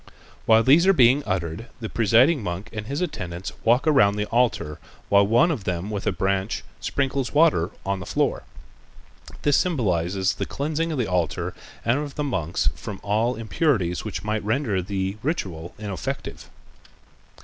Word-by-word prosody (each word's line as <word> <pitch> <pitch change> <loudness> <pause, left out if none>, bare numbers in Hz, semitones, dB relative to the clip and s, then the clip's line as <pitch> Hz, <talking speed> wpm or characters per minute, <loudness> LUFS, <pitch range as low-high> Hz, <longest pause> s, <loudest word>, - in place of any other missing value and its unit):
While 115 0 +6
these 155 +9 +5
are 195 - +7
being 130 +3 +6
uttered, 95 +3 -3
the 115 - -4
presiding 120 +8 +3
monk 95 +3 -5
and 105 -1 -5
his 140 +6 -3
attendants 90 - -4
walk 120 +3 +3
around 105 -10 +4
the 105 0 -1
altar, 110 -11 0 0.3
while 100 0 +5
one 140 +11 +4
of 130 -11 -3
them 90 +2 -3
with 100 -2 -4
a - - +3
branch 95 -3 -1 0.2
sprinkles 135 -1 -1
water 145 - +4 0.2
on 100 0 -1
the 90 - -8
floor. - - 0 1.0
This 145 -2 +4
symbolizes 95 - 0
the - - -4
cleansing 155 +3 -2
of 155 - -2
the 125 - +1
altar 90 -6 -1 0.3
and 120 +5 +2
of 145 -2 -5
the 150 - -2
monks 90 - -1
from 100 - -7
all 110 +4 +1
impurities 110 - 0
which 110 - -5
might 105 0 -2
render 110 -3 0
the 95 +1 -3
ritual 90 - -3
ineffective. 100 -4 -5
110 Hz, 160 wpm, -24 LUFS, 95-135 Hz, 1.0 s, are